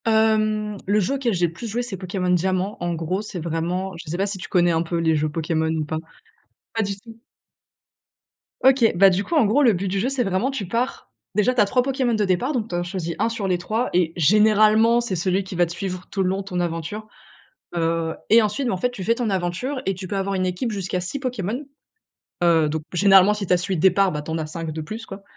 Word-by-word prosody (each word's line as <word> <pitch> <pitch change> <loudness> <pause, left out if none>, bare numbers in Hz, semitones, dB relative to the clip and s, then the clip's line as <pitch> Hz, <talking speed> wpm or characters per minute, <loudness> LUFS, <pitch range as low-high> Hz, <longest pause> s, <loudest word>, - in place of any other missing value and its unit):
Hem, 215 -1 +2
le 205 +2 +3
jeu 210 +8 0
auquel 255 -5 0
j'ai 175 0 +2
le 165 - -9
plus 230 +7 -7
joué, 235 +3 -2
c'est 220 -6 -2
Pokémon 180 0 -3
Diamant. 185 +3 0
En 175 0 -1
gros, 165 +4 -2
c'est 210 -4 -6
vraiment, 170 +4 -2
je 165 - -9
sais 170 - -2
pas 195 - +1
si 200 -1 +1
tu - - -6
connais 175 -2 +3
un 165 -1 +1
peu 170 0 -2
les 165 -1 +2
jeux 155 0 0
Pokémon 160 +1 -1
ou 160 -1 -1
pas? 155 +1 -3 0.8
Pas 225 - 0
du 200 -1 -3
tout. 225 +2 -14 1.5
OK. 260 -3 +5
Bah, 195 +2 +7
du 190 +2 0
coup, 335 - -3
en 290 -7 +5
gros, 245 +8 +3
le 235 -5 +5
but 190 +2 -2
du 195 +1 -1
jeu, 240 +7 0
c'est 270 -2 +1
vraiment 195 +6 0
tu 265 -7 -4
pars, 235 +6 -3 0.2
déjà 215 +4 +3
tu 245 - +3
as - - +5
3 250 +5 +2
Pokémon 260 -2 0
de 215 -2 +1
départ, 190 +10 0
donc 230 -4 -2
tu - - -3
en 175 - -1
choisis 175 -2 -4
1 - - +2
sur 230 -4 -3
les 180 -1 +1
3 215 +8 -2
et 175 -2 +2
généralement, 215 +6 +4
c'est 235 -6 -2
celui 185 +3 0
qui 190 0 -8
va 175 0 +3
te 170 - -7
suivre 185 0 -4
tout 195 - -1
le 180 - +1
long 190 +1 -1
de - - -4
ton 180 -2 -3
aventure. 175 +5 -4 0.7
Heu 165 -1 0 0.2
et 225 +2 +8
ensuite, 240 +5 -1
en 190 - -1
fait, 250 - +1
bah, - - -11
tu 195 -6 -6
fais 230 - +2
ton 235 -1 -2
aventure 190 +9 -2
et 195 - +1
tu 185 0 -8
peux 200 - -3
avoir 195 0 -1
une 185 -1 0
équipe 185 +6 -2
jusqu'à 185 -2 -2
6 185 +10 0
Pokémons. 250 0 -3 0.8
Heu, 165 -3 +4
donc, 155 +1 -3
généralement, 195 +2 +6
si 210 -1 -4
tu - - 0
as 180 - +4
celui 185 +1 -1
de 160 - -3
départ, 190 +1 +4
ben, 150 -1 -4
tu 150 - -8
en 160 - -1
as 155 - -3
5 165 +1 -5
de 160 - -5
plus, 215 +9 -7
quoi. 195 +1 -9
195 Hz, 260 wpm, -22 LUFS, 175-220 Hz, 1.5 s, et